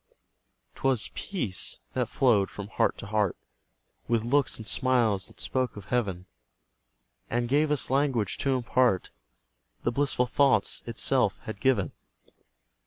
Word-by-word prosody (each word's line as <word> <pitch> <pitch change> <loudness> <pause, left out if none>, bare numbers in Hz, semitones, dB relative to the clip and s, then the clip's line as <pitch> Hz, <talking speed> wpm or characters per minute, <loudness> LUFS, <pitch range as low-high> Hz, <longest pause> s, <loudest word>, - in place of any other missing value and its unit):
'Twas 130 -4 +1
PEACE 155 - -3 0.2
that - - -1
flowed 110 -7 +3
from 100 0 -8
heart - - +1
to - - -8
heart, 105 -2 0 0.7
With 115 -2 +1
looks 140 +4 +1
and 110 - -8
smiles 120 -8 +2
that - - -12
spoke 130 -4 -1
of 100 - -9
heaven, 95 -7 -1 1.0
And 120 0 0
gave 145 +4 +2
us 150 -3 0
language 135 -7 +1
to 135 -2 +1
impart 120 -5 +1 0.7
The 120 - +1
blissful 135 -1 +1
thoughts 140 +2 +2
itself 115 -2 +2
had 110 -2 -7
given. 120 - +1
120 Hz, 130 wpm, -27 LUFS, 105-135 Hz, 1.0 s, flowed